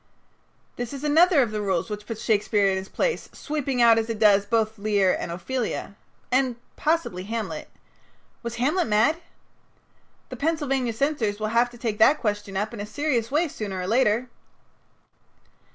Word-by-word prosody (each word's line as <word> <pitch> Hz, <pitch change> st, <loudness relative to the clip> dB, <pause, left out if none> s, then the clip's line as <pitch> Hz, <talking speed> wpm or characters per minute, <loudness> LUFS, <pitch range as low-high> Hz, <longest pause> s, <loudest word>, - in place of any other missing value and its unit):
This 245 Hz, +2 st, -4 dB
is 275 Hz, 0 st, -7 dB
another 315 Hz, 0 st, +5 dB
of 225 Hz, -, -3 dB
the 210 Hz, -1 st, -2 dB
rules 190 Hz, -4 st, 0 dB
which 210 Hz, 0 st, -6 dB
puts 225 Hz, -2 st, -6 dB
Shakespeare 210 Hz, -1 st, +2 dB
in 190 Hz, -, 0 dB
his 190 Hz, 0 st, -6 dB
place, 480 Hz, -, -1 dB
sweeping 275 Hz, -5 st, -1 dB
out, 230 Hz, -1 st, +6 dB
as 225 Hz, +1 st, -3 dB
it 225 Hz, -, -2 dB
does, 205 Hz, -2 st, +4 dB
both 220 Hz, -2 st, 0 dB
Lear 200 Hz, -2 st, +2 dB
and 170 Hz, -, -4 dB
Ophelia. 220 Hz, +2 st, -3 dB, 0.4 s
And 255 Hz, -1 st, +2 dB, 0.2 s
possibly 305 Hz, -, -1 dB
Hamlet. 225 Hz, +1 st, -4 dB, 0.7 s
Was 235 Hz, -1 st, -5 dB
Hamlet 290 Hz, +9 st, +1 dB
mad? 220 Hz, +9 st, +3 dB, 1.1 s
The -, -, -7 dB
Pennsylvania 280 Hz, -6 st, 0 dB
censors 225 Hz, -5 st, -1 dB
will 215 Hz, 0 st, -1 dB
have 240 Hz, +1 st, +3 dB
to 240 Hz, -, -14 dB
take 225 Hz, -3 st, -3 dB
that 275 Hz, +7 st, +6 dB
question 205 Hz, -3 st, -2 dB
up 215 Hz, +3 st, -2 dB
in 230 Hz, -, -7 dB
a 205 Hz, -, -3 dB
serious 260 Hz, -4 st, -1 dB
way 310 Hz, +5 st, +1 dB
sooner 205 Hz, -9 st, -5 dB
or 180 Hz, -, -3 dB
later. 230 Hz, +2 st, +2 dB
230 Hz, 170 wpm, -25 LUFS, 210-270 Hz, 1.1 s, out